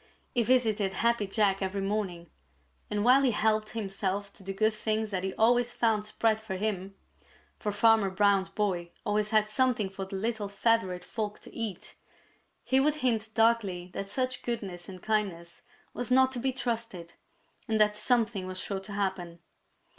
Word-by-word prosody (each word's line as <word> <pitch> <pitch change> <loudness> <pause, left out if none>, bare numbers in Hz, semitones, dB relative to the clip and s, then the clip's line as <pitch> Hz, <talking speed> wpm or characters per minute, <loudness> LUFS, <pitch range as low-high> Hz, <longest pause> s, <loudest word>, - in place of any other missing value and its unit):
He 245 - +3
visited 220 -5 +2
Happy 230 0 +1
Jack 195 -1 +2
every 195 +1 -2
morning, 195 -4 -3 0.6
and 210 0 -1
while 255 +3 +7
he 270 - +3
helped 215 -1 +1
himself 200 -2 -3
to - - -15
the 195 0 -5
good 215 +3 +2
things 215 0 -1
that 185 -2 -2
he 190 - -1
always 240 +2 +3
found 215 -2 +1
spread 220 0 +1
for 215 -3 -5
him, 195 -1 -3 0.6
for 210 - -2
Farmer 220 -1 +4
Brown's 195 0 +2
boy 190 -4 -1 0.2
always 210 0 +1
had 215 -1 +3
something 220 -2 +1
for 195 0 -5
the 190 - -7
little 215 0 -2
feathered 195 -3 +1
folk 210 -3 -4
to - - -12
eat, 220 -6 -5 0.7
he 265 - +3
would 295 +2 +3
hint 235 -6 0
darkly 205 -6 +2
that 195 - -5
such 255 +4 -2
goodness 195 -7 -4
and 185 -1 -10
kindness 190 -6 -2 0.3
was 245 - -3
not 260 +1 +5
to 255 - -4
be 265 +2 0
trusted, 230 -9 -4 0.5
and 220 -1 +1
that 210 0 +4
something 225 -4 +1
was 185 0 -5
sure 195 0 -3
to 195 +1 -8
happen. 190 -4 -2
210 Hz, 170 wpm, -29 LUFS, 195-230 Hz, 0.7 s, while